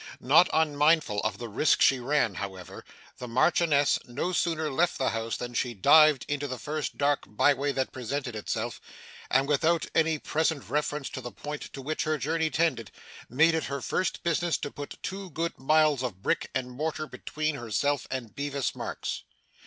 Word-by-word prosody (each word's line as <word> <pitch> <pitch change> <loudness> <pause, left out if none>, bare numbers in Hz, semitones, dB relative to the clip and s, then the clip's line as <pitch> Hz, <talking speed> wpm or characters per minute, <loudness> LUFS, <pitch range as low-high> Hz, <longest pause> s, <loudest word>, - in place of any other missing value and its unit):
Not 155 +7 +5
unmindful 150 -6 +2
of 105 -1 -1
the 120 - -6
risk 115 +7 +2
she 130 - +5
ran, 125 -4 +1
however, 95 -1 -7 0.4
the 125 - -6
Marchioness 145 +3 +3
no 145 +9 -3
sooner 160 -3 0
left 170 +5 +1
the 130 - +1
house 115 0 -3
than 120 0 -6
she 120 0 -1
dived 150 +6 +6
into 145 0 -2
the 130 -1 -5
first 150 +5 -4
dark 145 0 +1
by 105 +7 +3
way 140 +1 -1
that 135 -1 -2
presented 130 0 -4
itself, 110 +2 -3 0.5
and, 135 +1 +3
without 160 +3 +2
any 160 -1 +2
present 155 -1 -1
reference 150 -1 -1
to 130 - -6
the 120 - -7
point 150 +3 -7
to 135 - -7
which 155 +3 -2
her 155 0 0
journey 160 +2 0
tended, 150 -9 0 0.4
made 155 +7 +4
it 160 - 0
her 140 0 -3
first 185 +7 -2
business 170 0 +1
to 145 - -5
put 145 0 -8
two 195 0 -5
good 170 0 -3
miles 155 0 +3
of 105 -7 -5
brick - - 0
and 125 -1 -2
mortar 155 +4 -3
between 155 0 -3
herself 140 +3 -1
and 125 -5 -5
Bevis 140 -1 -2
Marks. - - -4
145 Hz, 180 wpm, -28 LUFS, 125-155 Hz, 0.5 s, dived